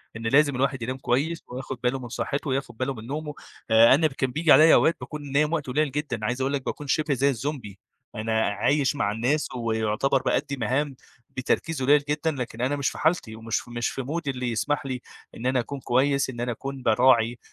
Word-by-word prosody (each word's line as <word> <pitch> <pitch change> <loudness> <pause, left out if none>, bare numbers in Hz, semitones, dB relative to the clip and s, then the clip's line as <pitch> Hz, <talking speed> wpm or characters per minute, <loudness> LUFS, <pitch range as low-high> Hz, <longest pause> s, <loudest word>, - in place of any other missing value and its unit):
إن 115 0 -4
لازم 145 +2 +4
الواحد 135 -1 0
ينام 130 +3 -3
كويس 145 +6 -1
وياخد 130 0 -6
باله 130 +2 +1
من 120 -2 -8
صحّته، 140 +5 -3
وياخد 135 -3 -3
باله 130 +2 -1
من 115 -1 -10
نومه. 150 +1 -4 0.4
آآ 115 +2 +7
أنا 155 +1 +3
كان 130 -2 -2
بييجي 155 +2 +2
عليّا 155 +4 +8
أوقات 165 - +3
باكون 145 -3 -7
نايم 150 +3 +2
وقت 150 -5 -2
قليل 145 +2 0
جدًا، 135 -7 -3
عايز 125 +4 -1
أقول 135 +2 0
لك 135 -2 -2
باكون 145 - -5
شِبه 155 +1 +1
زي 140 +2 +2
الزومبي. 125 -6 -4 0.4
أنا 110 +1 0
عايش 135 +8 +1
مع 105 -6 0
الناس 125 +8 0
ويعتبر 115 +3 0
بأدّي 140 -1 -1
مهام 130 +4 -1 0.3
بتركيز 135 +3 -2
قليّل 145 +2 +4
جدًا، 155 +2 0
لكن 125 -4 -5
أنا 130 +3 +1
مش 140 -2 0
في - - -9
حالتِي 155 -9 0
ومش 115 +2 -3
مش 120 0 -2
في - - -4
مودي 145 +3 -3
اللي 125 -1 -3
يسمح 145 +5 -1
لي 130 -2 -4 0.4
إن 120 - -7
أنا 130 0 +2
أكون 140 +3 -4
كويس، 135 +2 +1
إن 120 - -7
أنا 120 - -1
أكون 135 +2 -6
باراعي، 115 0 +3
130 Hz, 210 wpm, -25 LUFS, 120-145 Hz, 0.4 s, عليّا